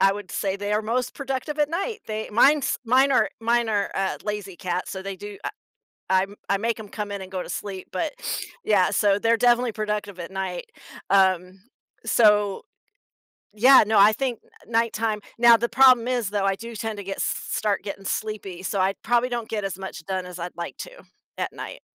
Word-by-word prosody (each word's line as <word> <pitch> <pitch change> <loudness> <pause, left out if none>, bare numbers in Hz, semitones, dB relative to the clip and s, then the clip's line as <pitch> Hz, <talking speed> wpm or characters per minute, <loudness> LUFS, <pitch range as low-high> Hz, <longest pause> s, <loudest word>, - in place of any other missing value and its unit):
I 195 - +5
would 205 -2 -8
say, 195 -1 -1
they 205 +1 -3
are 210 - +2
most 240 +3 -1
productive 270 +2 -4
at 295 -1 +3
night. 395 +7 -3
They 215 0 -4
Mine's 275 +7 +4
mine 260 +4 +4
are - - +3
mine 235 +1 +2
are, 205 -2 0
uh, 195 0 -1
lazy 205 -3 -4
cats, 180 +1 -3
so 190 - -5
they 195 0 -5
do, 205 +1 -9
uh - - 0 0.6
I 185 0 +4
m 200 +1 -7
I 200 - +3
make 225 +2 -1
'em 210 - -9
come 205 0 -5
in 200 - -4
and 190 -1 -9
go 185 -1 -3
to - - -9
sleep, 195 -2 -6
but, 290 - -2 0.5
yeah, 200 -4 +3
so 205 -2 +3
they're 230 +2 +3
definitely 245 0 +3
productive 210 -2 -3
at 170 0 -6
night. 190 -2 -4 0.5
Um, 190 -1 +3 0.5
so 210 -3 +4 1.0
Yeah, 260 +3 +8
no, 220 0 +3
I 205 +2 +7
think 245 0 -2 0.3
nighttime. 225 -2 0 0.2
Now, 235 0 +8
the 235 +1 -1
problem 250 -1 +6
is, 245 -5 0
though, 205 -1 -1
I 195 -1 +1
do 230 +2 -8
tend 220 -1 -4
to 200 - -6
get 195 +1 -5
start 210 -2 -1
getting 195 -1 -7
sleepy, 195 -3 -4
so 190 +1 -1
I 190 +1 +2
probably 240 +1 +2
don't 235 -2 -3
get 210 -2 -3
as 195 -1 -4
much 190 -3 -7
done 185 -1 -3
as 180 0 -8
I'd 175 +1 -6
like 170 0 -6
to - - -13 0.5
at - - -2
night. - - -8
210 Hz, 205 wpm, -24 LUFS, 195-235 Hz, 1.0 s, Yeah